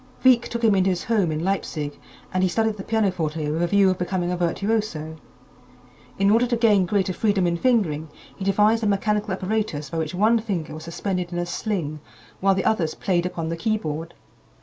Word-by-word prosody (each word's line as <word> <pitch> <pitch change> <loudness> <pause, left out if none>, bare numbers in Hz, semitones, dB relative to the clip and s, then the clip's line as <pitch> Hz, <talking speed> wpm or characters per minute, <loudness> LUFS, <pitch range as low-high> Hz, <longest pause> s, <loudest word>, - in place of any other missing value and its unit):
Wieck 255 -2 +5
took 235 0 -4
him 220 -2 +5
into 190 -1 +3
his 180 -2 -1
home 205 -8 +1
in 155 +1 -2
Leipzig 155 -6 -2 0.3
and 185 - +1
he 185 - +3
studied 220 +3 +1
the 195 - -6
pianoforte 170 -9 -1
with 160 +2 -1
a 175 - +2
view 200 +1 +4
of 185 - -3
becoming 180 0 -1
a - - 0
virtuoso. 175 -3 -1 1.0
In 195 +1 +3
order 235 +3 +4
to 240 -1 0
gain 210 -5 +4
greater 190 -1 +1
freedom 205 -2 +1
in 170 -1 +1
fingering, 170 -8 +1 0.3
he 195 - -7
devised 210 +3 +3
a - - +2
mechanical 210 +1 0
apparatus 185 -7 -2
by 165 - -2
which 160 +2 -3
one 220 +5 +4
finger 195 -8 -3
was 155 0 -8
suspended 180 +1 -3
in 175 - -3
a 175 - -1
sling 175 -5 -3 0.4
while 195 0 +3
the 190 - -1
others 165 -8 +1
played 180 -2 0
upon 165 -2 -4
the 165 - -2
keyboard. 165 -4 -2
185 Hz, 200 wpm, -23 LUFS, 170-215 Hz, 1.0 s, Wieck